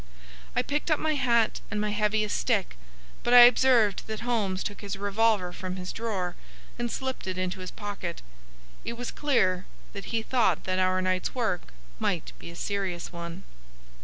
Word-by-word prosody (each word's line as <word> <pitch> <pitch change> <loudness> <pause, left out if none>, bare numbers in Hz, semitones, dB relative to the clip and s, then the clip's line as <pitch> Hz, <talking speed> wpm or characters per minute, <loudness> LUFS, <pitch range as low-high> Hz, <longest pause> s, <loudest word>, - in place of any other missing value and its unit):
I - - +2
picked 295 +3 -2
up 310 - +3
my 315 0 +1
hat 240 -5 +2
and 210 - -2
my 210 0 0
heaviest 210 0 +1
stick, - - 0 0.5
but 245 - +3
I 245 - +12
observed 240 -4 +5
that 220 -1 -4
Holmes 210 -6 0
took 205 - -5
his 200 -1 -4
revolver 205 -2 +1
from 185 0 -5
his 180 -1 -5
drawer 195 -6 -2 0.4
and 240 -1 -1
slipped 260 -6 -4
it 185 -1 -2
into 185 0 -2
his 185 0 -5
pocket. 200 -5 -5 0.6
It - - -3
was 245 +1 -5
clear 185 -11 +1 0.3
that 200 - -6
he 225 -1 -1
thought 225 -9 +2
that 185 0 0
our 185 0 +2
night's 185 +3 0
work 220 - -1 0.3
might - - -1
be - - -9
a 170 - -10
serious 185 -2 -3
one. 170 +2 -7
205 Hz, 175 wpm, -28 LUFS, 185-235 Hz, 0.6 s, I